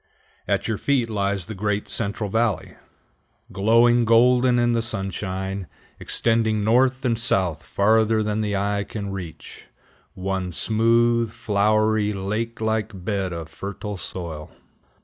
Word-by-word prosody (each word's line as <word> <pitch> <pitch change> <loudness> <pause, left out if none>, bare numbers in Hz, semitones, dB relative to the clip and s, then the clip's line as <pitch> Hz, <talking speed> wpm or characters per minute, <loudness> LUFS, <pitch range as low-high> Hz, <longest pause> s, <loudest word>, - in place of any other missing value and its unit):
At - - 0
your 110 -2 -2
feet 125 -5 +1
lies 100 -3 -1
the 110 - -7
great 105 +1 -2
Central 105 -1 -2
Valley 110 -2 -1 0.8
glowing 115 +4 +4
golden 125 +2 +4
in 120 0 +2
the 115 - +1
sunshine, 95 -3 -3 0.3
extending 110 -2 0
north 130 +4 +2
and 115 -2 +1
south 90 -8 +1
farther 110 +3 +2
than 105 0 -1
the 105 -1 -1
eye 100 +1 0
can 100 -1 -6
reach, 85 -5 -8 0.5
one 95 -1 -3
smooth, 115 +3 +2
flowery, 110 0 +1
lake 105 +4 -3
like 110 -4 -2
bed 95 -3 -1
of 85 -2 -5
fertile 100 +4 -6
soil. 85 -4 -6
105 Hz, 130 wpm, -23 LUFS, 95-115 Hz, 0.8 s, glowing